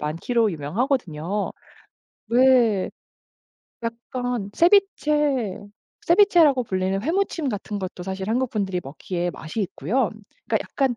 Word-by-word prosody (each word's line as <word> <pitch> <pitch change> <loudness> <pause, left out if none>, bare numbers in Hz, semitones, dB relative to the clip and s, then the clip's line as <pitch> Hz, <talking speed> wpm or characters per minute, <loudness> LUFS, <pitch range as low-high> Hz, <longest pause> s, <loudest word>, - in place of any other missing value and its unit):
많기로 200 +8 0
유명하거든요. 185 - -2 0.8
왜 240 -5 +4 0.9
약간 235 -1 -4
세비체 300 - +2 0.5
세비체라고 340 -8 +5
불리는 190 0 -1
회무침 330 -2 0
같은 205 -1 -4
것도 185 -1 -6
사실 190 +1 -4
한국분들이 215 -7 -1
먹기에 175 +5 -3
맛이 160 +7 -6
있고요. 205 - -1 0.4
그니까 - - +2
약간 265 -4 -1
230 Hz, 275 characters per minute, -23 LUFS, 190-265 Hz, 0.9 s, 세비체라고